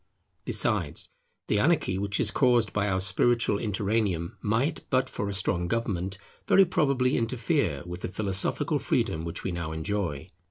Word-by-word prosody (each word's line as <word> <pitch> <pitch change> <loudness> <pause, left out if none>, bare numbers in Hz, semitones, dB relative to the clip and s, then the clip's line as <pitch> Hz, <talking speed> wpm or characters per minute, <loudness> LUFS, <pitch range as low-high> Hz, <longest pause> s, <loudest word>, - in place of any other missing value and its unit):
Besides, - - 0 0.4
the 105 - +2
anarchy 135 - +2
which 100 +1 -1
is 110 - +2
caused 120 -5 +3
by 105 -1 +1
our 95 -1 +1
spiritual 100 +3 +2
interregnum, 100 -5 -1
might, 120 +9 0
but 130 0 +2
for 100 -5 -4
a - - -2
strong 90 -3 +1
government, 100 -3 -2 0.3
very 195 - +6
probably 135 -6 +2
interfere 115 - 0
with 90 0 -7
the - - -2
philosophical 95 0 -1
freedom 80 - 0
which 85 -1 -5
we 95 - -2
now 85 -2 -4
enjoy. 80 -2 -3
100 Hz, 155 wpm, -27 LUFS, 90-120 Hz, 0.4 s, very